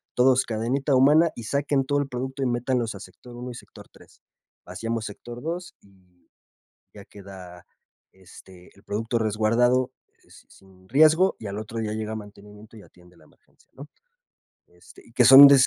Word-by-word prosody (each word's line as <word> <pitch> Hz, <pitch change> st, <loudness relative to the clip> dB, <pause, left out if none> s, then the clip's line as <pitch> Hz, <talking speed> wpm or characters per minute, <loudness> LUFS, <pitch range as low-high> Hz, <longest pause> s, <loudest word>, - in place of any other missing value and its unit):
todos 130 Hz, +1 st, +3 dB
cadenita 125 Hz, +5 st, -1 dB
humana 150 Hz, +5 st, +4 dB
y 120 Hz, -, -8 dB
saquen 140 Hz, +2 st, 0 dB
todo 145 Hz, +1 st, 0 dB
el 145 Hz, -, -2 dB
producto, 130 Hz, +2 st, -5 dB
y -, -, 0 dB
métanlos 120 Hz, -1 st, -1 dB
a 100 Hz, -, -9 dB
sector 120 Hz, +4 st, -14 dB
1 125 Hz, +1 st, -7 dB
y -, -, -10 dB
sector -, -, -14 dB
3. -, -, -21 dB, 0.4 s
Vaciamos 115 Hz, -1 st, -5 dB
sector 120 Hz, +4 st, -9 dB
2 170 Hz, +4 st, -6 dB
y 90 Hz, -3 st, -28 dB, 0.7 s
ya 100 Hz, -, -12 dB
queda, 95 Hz, -4 st, -13 dB, 0.5 s
este, 95 Hz, -1 st, -17 dB
el 100 Hz, -, -21 dB
producto 115 Hz, +3 st, -2 dB
resguardado, 115 Hz, +4 st, +1 dB, 0.3 s
eh, -, -, -27 dB, 0.2 s
sin 95 Hz, -1 st, -22 dB
riesgo 155 Hz, -, +4 dB
y 110 Hz, -, -9 dB
al 100 Hz, +1 st, -5 dB
otro 110 Hz, +1 st, -7 dB
día 110 Hz, -1 st, -3 dB
llega 110 Hz, 0 st, -4 dB
mantenimiento 105 Hz, +1 st, -13 dB
y 105 Hz, -, -13 dB
atiende 90 Hz, -1 st, -21 dB
la -, -, -21 dB
emergencia, -, -, -30 dB
¿no? 140 Hz, +2 st, -11 dB, 0.8 s
Este, 445 Hz, -, -19 dB
y 115 Hz, -, -20 dB
que 125 Hz, 0 st, +3 dB
son 135 Hz, +2 st, +11 dB
des 135 Hz, -2 st, +6 dB
115 Hz, 170 wpm, -24 LUFS, 100-130 Hz, 0.8 s, son